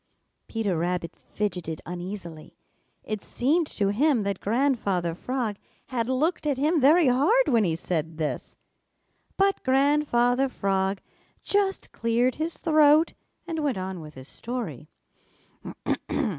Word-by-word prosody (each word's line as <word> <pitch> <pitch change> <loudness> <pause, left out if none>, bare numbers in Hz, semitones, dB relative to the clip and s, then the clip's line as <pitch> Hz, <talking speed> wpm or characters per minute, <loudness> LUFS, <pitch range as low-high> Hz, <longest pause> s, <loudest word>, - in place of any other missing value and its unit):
Peter 215 -5 -1
Rabbit 175 -1 -2
fidgeted 180 -6 -4
uneasily. 175 -2 -7 0.5
It 215 -2 -4
seemed 300 +6 +1
to 200 -7 -1
him 250 +2 +2
that 200 -2 -2
Grandfather 205 -8 0
Frog 235 +2 -3 0.3
had 240 -2 -1
looked 300 +5 0
at 285 -3 +1
him 305 +3 +2
very 305 +4 +6
hard 305 - +4
when 230 -5 +4
he 165 -2 +1
said 165 -1 -3
this. 155 -2 -3 0.8
But 390 0 +2
Grandfather 270 -2 +3
Frog 195 -3 -1 0.4
just 400 -1 0
cleared 235 +2 +1
his 325 +1 -2
throat 310 0 +4 0.3
and 330 -2 -3
went 285 -8 0
on 185 -1 -4
with 150 -1 -11
his 130 0 -10
story. 195 - -6
235 Hz, 125 wpm, -26 LUFS, 185-290 Hz, 0.8 s, very